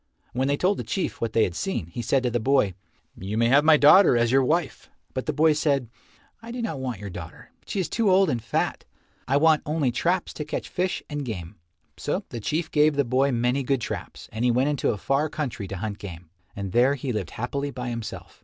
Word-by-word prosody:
When 130 +2 0
they 145 0 +1
told 190 +5 +2
the - - -3
Chief 190 - -3
what 115 -2 -2
they 115 - +4
had 90 - -1
seen, 190 - -2
he 85 +8 -6
said 130 +2 +1
to 125 - 0
the 120 - 0
boy, 130 -5 +2 0.4
"You 100 +4 -4
may 115 0 +3
have 140 +3 +5
my 155 -1 +6
daughter 150 -1 +7
as 120 0 +2
your 135 0 +4
wife." 160 +3 -1 0.2
But - - -4
the - - +2
boy 155 0 +4
said, 140 -6 0 0.5
"I 230 - -10
do 245 +1 -5
not 215 - -3
want 125 -6 -4
your 100 -1 -7
daughter. 85 -2 -10 0.2
She 200 - -2
is 185 - 0
too 230 -3 +1
old 190 +1 +5
and 125 -7 -1
fat. - - -1 0.4
I 135 +3 +3
want 155 0 +4
only 150 -4 0
traps 175 +8 0
to 150 - -4
catch 150 - -5
fish 180 +1 -2
and 145 -1 -4
game." 90 -9 -6 0.4
So - - -2
the 120 - -5
Chief 155 +9 -2
gave 150 0 +4
the 140 -1 +2
boy 130 +3 +2
many 125 +3 +1
good 135 0 0
traps, - - -6
and 110 +2 -3
he 125 - +4
went 130 +4 +2
into 145 -2 0
a 105 - 0
far 140 +8 0
country 130 -11 -4
to 95 - -5
hunt 100 +1 -4
game, 85 -4 -9 0.2
and 100 -2 -4
there 125 +6 +4
he 130 -2 -3
lived 100 -6 -3
happily 140 +5 -2
by 125 -2 -5
himself. 115 -2 -7
130 Hz, 240 wpm, -25 LUFS, 115-150 Hz, 0.5 s, daughter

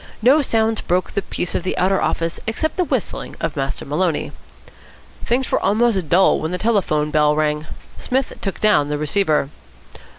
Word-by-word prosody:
No 275 +6 +6
sounds 225 -4 +1
broke 180 +1 -1
the 200 - -1
peace 180 - -3
of - - -1
the 185 - -3
outer 190 +1 +2
office 165 0 -1
except 300 +8 -1
the 365 - +1
whistling - - -3
of - - -3
Master - - -3
Maloney. - - -1 0.9
Things 255 +2 0
were - - +2
almost 205 -4 +1
dull 185 +2 +4
when 155 - -3
the 180 - -2
telephone 180 -9 0
bell 150 -1 +3
rang. 150 0 -1 0.3
Psmith 260 +1 -1
took 195 - -4
down 150 -9 +3
the 150 - -1
receiver. 150 -2 +1
190 Hz, 170 wpm, -20 LUFS, 155-225 Hz, 0.9 s, No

